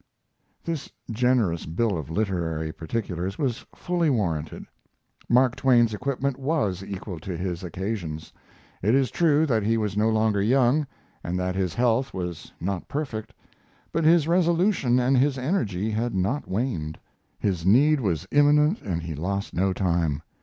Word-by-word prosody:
This 165 -4 -4 0.2
generous 115 -7 +1
bill 100 +6 0
of 80 -3 -5
literary 80 -5 -1
particulars 90 +2 -4
was 130 -3 -2
fully 175 -2 0
warranted. 85 - -2 0.6
Mark 125 +1 +4
Twain's 120 -4 +3
equipment 135 +3 -2
was 135 - 0
equal 95 -3 -6
to 85 +2 -5
his 90 0 -4
occasions. 90 -3 -5 0.5
It 110 +7 +3
is 135 -4 +2
true 160 -2 +3
that 115 -7 +1
he 115 +2 +1
was 105 -3 -1
no 105 +2 +2
longer 110 -2 +2
young, 130 +6 +3 0.4
and 90 +1 -2
that 90 0 -1
his 95 -2 -2
health 125 +2 +1
was 90 -3 -5
not 95 0 -3
perfect, 135 -8 -4 0.6
but 165 - 0
his 160 -1 +5
resolution 170 - +2
and 125 +2 +2
his 140 +1 +2
energy 110 - -1
had 115 +1 -1
not 100 +11 -1
waned. 95 - -2 0.4
His 95 -5 -1
need 140 - +5
was 90 - -1
imminent 150 +5 +4
and 85 -4 -3
he 85 -1 -4
lost 100 +6 -3
no 95 +2 +1
time. 85 -5 0
110 Hz, 150 wpm, -25 LUFS, 90-135 Hz, 0.6 s, his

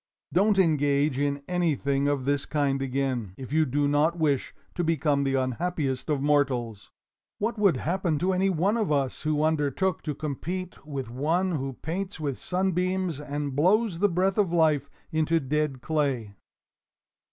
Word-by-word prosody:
Don't 200 +3 +3
engage 145 -5 +2
in 140 0 -1
anything 145 -6 +1
of 140 -3 0
this 140 0 0
kind 140 -3 0
again, 130 -7 -2
if 130 +1 -7
you 155 -1 +3
do 145 +3 +1
not 150 +4 +2
wish 145 -5 +1 0.2
to 175 - -1
become 150 -3 +1
the 135 -1 0
unhappiest 135 +1 -1
of 145 -2 0
mortals! 125 -8 0 0.5
What 220 +1 -2
would 195 -9 +4
happen 175 +1 0
to 185 +5 +1
any 190 +1 +2
one 190 +5 +1
of 215 -8 0
us 140 -3 0
who 155 -1 0
undertook 160 +4 0
to 150 -3 -4
compete 165 +6 -5
with 135 -5 -5
one 165 +9 0
who 135 -4 -2
paints 185 +3 -3
with 140 -4 -3
sunbeams 185 -2 -1
and 145 -2 -4
blows 185 +4 +2
the 205 +2 +3
breath 190 +3 +1
of 195 -5 +2
life 155 -4 +2 0.2
into 160 +1 +2
dead 145 -2 -1
clay?" 135 -9 -1
150 Hz, 160 wpm, -27 LUFS, 140-180 Hz, 0.5 s, would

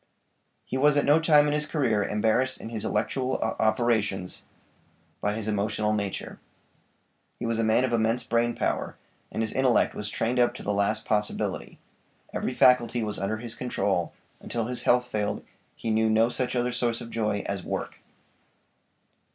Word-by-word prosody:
He 130 - -3
was 145 +2 +4
at 145 - +3
no 150 +3 +5
time 150 -2 +5
in 145 - +1
his 150 0 0
career 120 -10 +1
embarrassed 110 +6 +1
in - - -7
his 110 -2 -5
intellectual 125 +5 -1
operations 110 -4 0 0.7
by 105 - 0
his 110 0 -4
emotional 105 0 0
nature; 100 -2 -4 1.0
he - - -5
was 115 -1 -1
a - - +2
man 110 +3 +3
of 130 - -2
immense 115 +1 +1
brain 120 0 +1
power, - - -2 0.3
and 110 - -1
his 110 - -2
intellect 130 -2 +3
was 105 0 -5
trained 120 +4 -1
up 120 0 +3
to - - -8
the 105 - -1
last 105 +2 0
possibility; 105 -1 -2 0.6
every - - -2
faculty 120 -2 +4
was 105 -1 -3
under 105 +3 -1
his 115 0 -5
control; 100 -9 -1 0.3
until 115 -2 -3
his 125 +2 -2
health 125 0 +3
failed 105 -3 -2 0.3
he 115 - -3
knew 110 0 +2
no 110 +1 +4
such 125 +1 -2
other 125 0 +1
source 120 -1 -1
of 115 - -9
joy 105 -3 -1
as 100 -2 -3
WORK. - - -4
115 Hz, 170 wpm, -27 LUFS, 105-125 Hz, 1.0 s, no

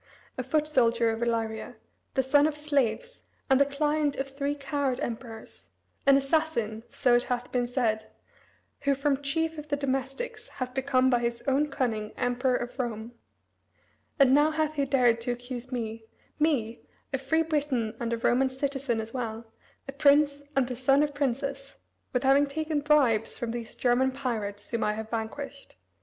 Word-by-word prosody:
A - - -2
foot 300 +4 0
soldier 235 -5 +3
of 225 +1 -4
Illyria, 230 0 -2 0.4
the 265 - +3
son 285 +3 +4
of 310 - -2
slaves, 300 - -1 0.3
and 265 +1 +6
the 280 - +5
client 295 0 0
of 270 - -2
three 280 +1 -2
coward 275 -2 -1
emperors; 225 -1 -7 0.4
an 275 0 +8
assassin, 275 -7 0
so 245 - +2
it 240 0 +3
hath 245 0 -3
been 245 -1 0
said, 225 -4 -1 0.7
who 280 0 +1
from 275 0 0
chief 320 +3 -1
of 300 - -9
the 290 - 0
domestics, 280 - -3
hath 255 - -5
become 260 -1 +2
by 245 - +4
his 235 0 -2
own 280 +3 +2
cunning 230 -7 -2
Emperor 250 +1 +1
of 245 +2 -4
Rome, 230 -2 -3 1.1
And 270 -3 +6
now 295 +2 +5
hath 310 -1 0
he 285 -2 0
dared 245 -4 +3
to 245 - -1
accuse 245 +1 -6
me 225 -2 -4 0.3
me, 250 -7 +1 0.3
a - - 0
free 320 0 +1
Briton 285 -8 -1
and 235 -1 -2
a 235 - 0
Roman 255 +3 +2
citizen 265 -2 -2
as 220 +1 -6
well, 225 -2 -5 0.3
a - - -4
prince 285 0 +4
and 270 -2 +3
the 250 - -4
son 270 +3 +3
of 295 -1 -1
princes, 275 0 -2 0.4
with 250 +1 0
having 275 +2 +5
taken 310 +1 -1
bribes 270 -7 +3
from 235 -1 -3
these 235 -1 -6
German 255 +1 +2
pirates 220 -7 -4
whom 235 - 0
I 210 - +1
have 220 +1 -6
vanquished. 275 +5 -5
265 Hz, 175 wpm, -28 LUFS, 235-285 Hz, 1.1 s, an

